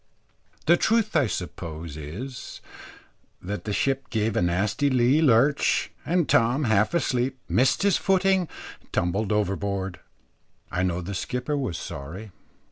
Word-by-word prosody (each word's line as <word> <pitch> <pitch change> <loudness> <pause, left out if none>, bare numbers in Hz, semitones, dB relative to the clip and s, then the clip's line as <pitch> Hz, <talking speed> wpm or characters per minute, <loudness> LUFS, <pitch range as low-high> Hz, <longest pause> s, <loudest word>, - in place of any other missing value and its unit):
The 170 +2 +5
truth, 220 -2 +1
I 140 -6 +4
suppose 85 -5 -5
is, 100 - -7 0.8
that 100 +3 -5
the 105 - -2
ship 135 +6 0
gave 110 -1 0
a - - +2
nasty 100 +11 +1
lee 130 +3 +3
lurch, 140 0 +3
and 170 +1 +1
Tom, 120 +5 +3
half 110 +5 +2
asleep, 130 -4 0
missed 130 +9 +2
his 200 -2 +4
footing, 190 -2 +2 0.3
and - - -29
tumbled 95 +5 0
overboard. 100 -2 -1 0.7
I 90 - -1
know 90 -1 0
the 95 +3 -5
skipper 125 +9 -2
was 130 -12 -2
sorry. 90 +10 -7
115 Hz, 135 wpm, -25 LUFS, 95-140 Hz, 0.8 s, The